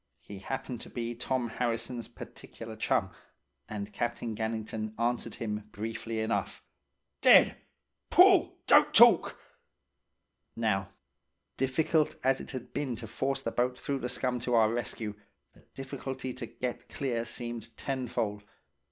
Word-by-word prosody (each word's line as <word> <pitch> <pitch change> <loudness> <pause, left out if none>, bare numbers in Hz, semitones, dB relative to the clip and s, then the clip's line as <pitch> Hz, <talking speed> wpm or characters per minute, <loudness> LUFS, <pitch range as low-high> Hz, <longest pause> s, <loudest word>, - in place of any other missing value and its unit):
He 100 -1 -9
happened 125 +2 -5
to - - -9
be 120 -1 -3
Tom 125 +1 -1
Harrison's 115 +1 -2
particular - - -10
chum, - - +1 0.6
and 105 -1 -5
Captain 120 -1 -2
Gannington 110 0 -3
answered 120 +1 -1
him 105 -1 -4
briefly 115 +1 -4
enough: 100 -4 -2 0.6
"'Dead! - - +7 0.5
Pull! - - +6
Don't - - +6
talk!" - - +7 1.2
"Now, 100 -4 0 0.7
difficult 150 +4 +1
as 135 +1 +3
it - - -9
had 130 -3 -7
been 140 -4 -1
to 115 - -8
force 135 +5 -2
the - - -1
boat 125 +1 0
through 140 +1 -2
the 125 - -3
scum 125 -1 -1
to 120 0 0
our 110 -1 +4
rescue, 115 -3 -3 0.4
the - - -20
difficulty 130 -1 -5
to 120 - -6
get 120 +2 -5
clear 120 -4 -2
seemed 120 0 -4
tenfold. 120 -6 -2
120 Hz, 135 wpm, -30 LUFS, 110-130 Hz, 1.2 s, Dead